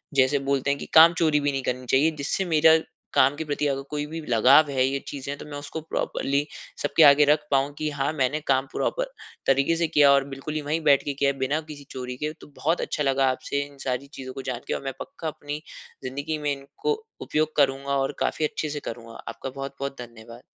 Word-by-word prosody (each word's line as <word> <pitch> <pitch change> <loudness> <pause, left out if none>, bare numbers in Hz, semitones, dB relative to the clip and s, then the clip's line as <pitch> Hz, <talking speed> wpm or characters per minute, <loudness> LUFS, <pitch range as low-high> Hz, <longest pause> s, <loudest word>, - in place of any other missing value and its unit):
जैसे 135 +1 +4
बोलते 140 0 +1
हैं 140 - +1
कि - - -6
काम 165 +1 +9
चोरी 155 -3 +2
भी 145 0 0
नहीं 135 -1 -2
करनी 125 0 -2
चाहिए, 150 +5 +4
जिससे 155 +6 -2
मेरा 160 -1 +5 0.4
काम 135 +2 +4
के 160 - -4
प्रति 145 0 -1
अगर 135 -1 -1
कोई 150 0 -2
भी 160 +2 -6
लगाव 130 +6 +6
है 130 -1 +2
ये 135 +1 -1
चीज़ें 140 0 -5
तो - - -9
मैं 145 -1 -7
उसको 145 +2 -6
प्रॉपरली 145 -2 -1 0.4
सबके 145 +2 +4
आगे 145 0 +8
रख 150 +1 +3
पाऊँ 140 +1 +2
कि 155 - -1
हाँ 145 +1 -1
मैंने 140 0 0
काम 135 0 +3
प्रॉपर - - -2 0.4
तरीके 135 +4 +3
से 165 0 +1
किया 145 -3 +5
और 140 -1 +5
बिल्कुल 135 +3 -6
ही 155 - -1
वहीं 155 +3 -1
बैठ 140 -2 +5
के 145 - -2
किया 140 0 +1
है 140 - -10
बिना 140 +4 0
किसी 145 -2 -9
चोरी 125 -1 -6
के। 150 +3 -2
तो - - -12
बहुत 165 +4 0
अच्छा 150 - -2
लगा 135 -1 +2
आपसे 140 +2 -3
इन 140 -1 -18
सारी 130 +2 -2
चीज़ों 130 -1 -7
को - - -6
जान 120 - -4
के - - -1
और - - -3
मैं 135 - -3
पक्का 275 - -7
अपनी 150 -1 -5 0.4
ज़िंदगी 140 +4 -3
में 150 -1 -1
इनको 140 - -3 0.3
उपयोग 155 0 -1
करूँगा 140 0 +2
और 135 0 -1
काफ़ी 155 - 0
अच्छे 155 0 -3
से 145 0 -4
करूँगा। 115 -3 -8
आपका 135 - -6
बहुत-बहुत 135 0 -6
धन्यवाद। 115 0 -11
140 Hz, 230 wpm, -25 LUFS, 135-150 Hz, 0.4 s, काम